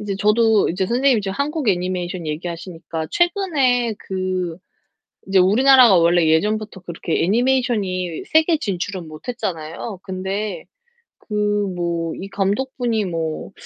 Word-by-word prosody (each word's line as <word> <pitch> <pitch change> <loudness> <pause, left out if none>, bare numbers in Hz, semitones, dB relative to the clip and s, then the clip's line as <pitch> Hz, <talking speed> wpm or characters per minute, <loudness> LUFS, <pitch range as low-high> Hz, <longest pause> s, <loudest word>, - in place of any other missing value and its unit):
이제 205 -2 -3
저도 215 +1 +3
이제 185 +2 -1
선생님이 250 +1 +2
지금 195 -1 -4
한국 295 -2 -1
애니메이션 180 -2 -1
얘기하시니까 165 0 -5
최근에 290 - +1
그 185 -3 -3 0.7
이제 195 0 +3
우리나라가 240 +3 +6
원래 170 0 +4
예전부터 210 +5 0
그렇게 170 -2 -2
애니메이션이 210 -6 0
세계 320 0 +3
진출은 185 - -4
못 155 +8 -12
했잖아요. 180 -3 -5
근데 190 0 -4 0.6
그 210 - -7 0.4
뭐 170 -2 -2
이 195 - -6
감독분이 225 +3 -1
뭐 165 -1 -4
195 Hz, 310 characters per minute, -20 LUFS, 175-235 Hz, 0.7 s, 우리나라가